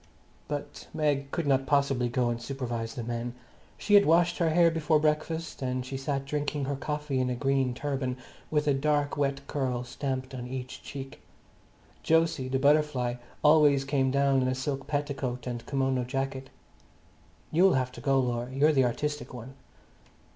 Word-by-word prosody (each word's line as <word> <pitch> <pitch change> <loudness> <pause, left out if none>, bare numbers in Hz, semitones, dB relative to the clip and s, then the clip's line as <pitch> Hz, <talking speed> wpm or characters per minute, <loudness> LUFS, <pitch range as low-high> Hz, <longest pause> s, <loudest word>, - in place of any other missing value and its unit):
But 145 -1 -6
Meg 145 -3 0
could 170 +2 -2
not 135 -1 +2
possibly 135 -3 +2
go 120 0 +1
and 120 0 -4
supervise 120 -4 -4
the 120 - -4
men. 120 +1 -4 0.4
She 205 - -1
had 205 -4 +7
washed 175 +2 +3
her 170 -2 +3
hair 170 +1 +5
before 160 -1 +2
breakfast, 155 +2 -1
and 130 -1 -2
she 135 - -6
sat 135 0 -2
drinking 145 0 -2
her 140 +1 -2
coffee 150 0 -2
in 130 0 +1
a 125 - -1
green 135 -1 +1
turban, 135 -2 -2 0.3
with 150 -1 0
a 145 - +4
dark 145 +1 +1
wet 140 -1 -1
curl 130 -4 -2
stamped 130 +1 -4
on 125 -1 -5
each 130 0 -6
cheek. 135 -1 -8 0.9
Jose, 165 -5 +3
the 130 +1 0
butterfly, 140 -3 +2 0.3
always 150 -3 +5
came 135 -1 +1
down 140 0 +3
in 130 - +1
a 130 - 0
silk 135 0 -3
petticoat 140 -4 -2
and 120 -2 -4
a - - -22
kimono 135 -2 0
jacket. 135 +1 -3 1.0
"You'll 185 +4 +5
have 130 -1 0
to 120 - -10
go, 135 0 +3
Laura; 120 -1 -1
you're 145 +4 +3
the 135 -3 +4
artistic 150 +3 -3
one." 125 +2 -9
135 Hz, 175 wpm, -28 LUFS, 130-150 Hz, 1.0 s, had